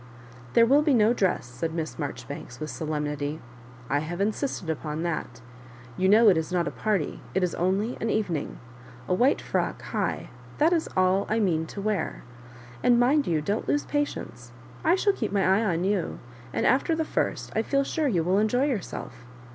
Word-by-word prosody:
"There 230 - +7
will 275 +5 +5
be 300 -3 +3
no 220 0 +4
dress, 190 - 0
said 160 +7 -4
Miss 160 -2 -4
Marjori 145 -3 -5
banks, 135 -3 -8
with 155 -2 -4
solemnity. 150 +1 -3 0.5
"I 145 - +1
have 165 +4 -5
insisted 210 - -1
upon 155 0 -3
that. 125 -8 -3 0.5
You 190 +7 +2
know 220 +3 +7
it 185 - +4
is 160 +2 -2
not 175 -2 +1
a - - -2
party, 205 -7 -1
it 190 - +2
is 180 - 0
only 195 +7 0
an 225 - 0
Evening. 180 -10 -1 0.5
A - - +1
white 250 +9 +3
firock, - - -2
high^ihai - - -2 0.4
is 330 -2 0
all 185 +1 +3
I 220 +2 +1
mean 165 -6 +1
to 200 - -7
wear; 210 -1 -2 0.6
and 240 - +4
mind 280 +4 +3
you 160 -3 +1
don't 200 +8 -2
lose 290 - +1
patience. 120 - -3 0.3
I 335 - +4
shall 400 +1 +2
keep 220 - -3
my 200 -1 +2
eye 195 +4 +3
on 175 -5 0
you; 195 -2 0 0.3
and - - -1
after 275 +5 +3
the 320 0 -1
first, - - -2
I 220 - +3
feel 275 +4 +1
sure 305 +2 -1
you 180 -10 +1
will 185 +4 +2
enjoy 245 +5 +2
yourself. 240 - -4
190 Hz, 190 wpm, -26 LUFS, 160-235 Hz, 0.6 s, There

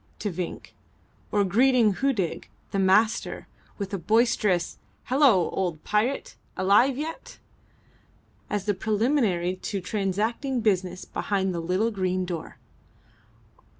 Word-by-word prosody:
to 205 - -3
Vinck, 175 0 -6 0.6
or 205 -1 +3
greeting 230 +2 +4
Hudig, 240 -11 -1 0.2
the 195 - -1
Master, 210 +4 +2 0.3
with 200 0 -5
a 195 - -1
boisterous 210 -3 +1 0.2
"Hallo, 255 - +3
old 175 -5 -2
pirate! 225 +6 -1 0.2
Alive 205 +8 +4
yet?" 315 +3 -6 1.1
as 205 -1 -2
a 205 - +3
preliminary 205 -4 0
to 200 +1 -4
transacting 215 +7 -1
business 185 -4 0
behind 190 -2 -1
the 170 - -3
little 185 +7 0
green 185 -2 -1
door. 170 -3 -6
200 Hz, 115 wpm, -26 LUFS, 185-230 Hz, 1.1 s, greeting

